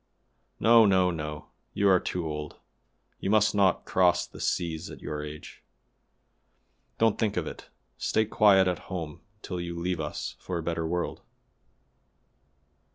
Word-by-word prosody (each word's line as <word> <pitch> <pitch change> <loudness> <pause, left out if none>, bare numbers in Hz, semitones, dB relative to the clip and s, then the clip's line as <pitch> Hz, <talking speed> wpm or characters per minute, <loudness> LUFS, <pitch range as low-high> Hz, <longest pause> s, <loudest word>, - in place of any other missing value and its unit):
No! 115 0 +7
no! 95 -2 +3
no! 75 -2 -6 0.3
you 100 - +2
are 95 -2 +6
too 90 -1 -3
old; 75 -1 -5 0.6
you - - -3
must 110 0 +4
not 100 -2 +2
cross 90 -1 +3
the - - -14
seas 85 -2 -2
at - - -10
your 75 0 -5
age; 75 0 -9 1.4
don't 115 -1 +2
think 105 -3 0
of 85 - 0
it; - - -9 0.3
stay 110 - +1
quiet 100 -3 +5
at 90 - -1
home 80 -6 -5 0.2
till 90 -2 -4
you 85 0 -5
leave 90 0 -2
us 75 -1 -4
for 90 - -4
a 85 - -4
better 85 0 -2
world." 90 +1 -2
90 Hz, 150 wpm, -28 LUFS, 80-95 Hz, 1.4 s, No